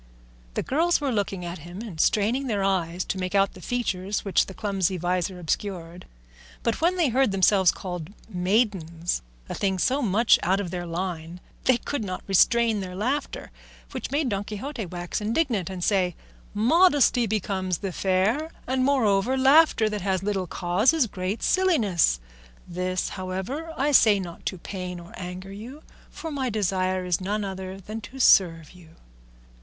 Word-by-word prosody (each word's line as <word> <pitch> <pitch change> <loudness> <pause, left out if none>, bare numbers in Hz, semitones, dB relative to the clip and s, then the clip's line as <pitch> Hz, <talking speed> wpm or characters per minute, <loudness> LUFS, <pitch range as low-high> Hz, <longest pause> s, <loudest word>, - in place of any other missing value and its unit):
The - - -1
girls 335 +6 +2
were 285 -3 -1
looking 195 -4 -2
at 175 0 -6
him 175 +7 -8
and 180 -9 -3
straining 235 +6 +2
their 205 -5 0
eyes 180 -2 0
to 190 - -3
make 185 +1 -3
out 195 0 +3
the 185 - -13
features 200 -4 -2
which 195 - +2
the 190 - -9
clumsy 195 -3 -1
visor 180 +1 -1
obscured, 175 0 -4 0.6
but - - -1
when 345 +3 +3
they 335 -6 +3
heard 260 -1 +2
themselves 190 -2 +4
called 180 -3 -6 0.2
maidens, 180 - 0 0.3
a - - -5
thing 190 -1 0
so 260 +9 +1
much 220 +1 +4
out 190 +3 +1
of 185 -4 -4
their 175 -1 -4
line, 170 -1 -4 0.3
they 255 -2 +5
could 245 +1 -4
not 185 -2 -5
restrain 225 +3 +3
their 185 -2 -6
laughter, 255 +9 -2 0.4
which - - -5
made 285 -1 0
Don 200 -2 -1
Quixote 220 +1 -5
wax 175 +3 -4
indignant, 225 - 0
and 185 -2 -5
say, 185 -4 +1 0.4
"Modesty 275 - +4
becomes 190 -3 -1
the 195 +2 -4
fair, 195 - +1 0.2
and 260 0 0
moreover 255 -3 +2
laughter 270 -3 +5
that 210 -1 -3
has 190 -1 -1
little 195 -3 -1
cause 180 - +2
is 320 -6 +3
great 190 0 -4
silliness; 220 - +2 0.5
this, 180 +1 -2
however, 190 - -5
I 290 +2 +1
say 215 -7 +6
not 175 -3 -7
to 185 - -3
pain 180 0 -6
or 170 0 -13
anger 185 +1 -7
you, 245 +9 -10 0.3
for 325 - -7
my 270 -3 -1
desire 185 -3 0
is 180 0 0
none 205 +3 -1
other 190 0 -6
than 215 +3 -7
to 265 +4 -10
serve 165 -10 +4
you." 170 -3 -17
195 Hz, 170 wpm, -25 LUFS, 180-235 Hz, 0.6 s, say